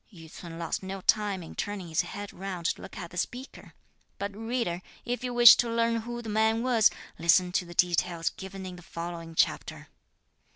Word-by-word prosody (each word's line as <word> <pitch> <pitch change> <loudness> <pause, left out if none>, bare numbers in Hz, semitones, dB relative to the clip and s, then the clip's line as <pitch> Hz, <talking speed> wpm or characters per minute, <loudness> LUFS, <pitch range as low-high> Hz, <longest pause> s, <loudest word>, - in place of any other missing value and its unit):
Yü 165 -5 -12
ts'un 165 -2 -9
lost 170 - -3
no 190 +1 -5
time 205 -3 +2
in 160 - -10
turning 205 -4 -4
his 160 -1 +1
head 205 0 -7
round 185 -2 -6
to - - 0
look - - -10
at 170 -3 -7
the 180 - -9
speaker. 250 +8 -5 0.4
But 200 0 -4
reader, 225 -5 -2 0.2
if 245 0 -2
you 250 - -2
wish 240 -1 +10
to 240 - +1
learn 230 0 +1
who 240 +1 -5
the - - -8
man 220 +2 +2
was, 240 -4 +5 0.3
listen 170 +2 +4
to 185 0 0
the 175 - -10
details 175 -1 +2
given 190 0 -8
in 180 -1 -7
the - - -11
following 170 -2 -7
chapter. - - 0
195 Hz, 200 wpm, -28 LUFS, 175-225 Hz, 0.4 s, wish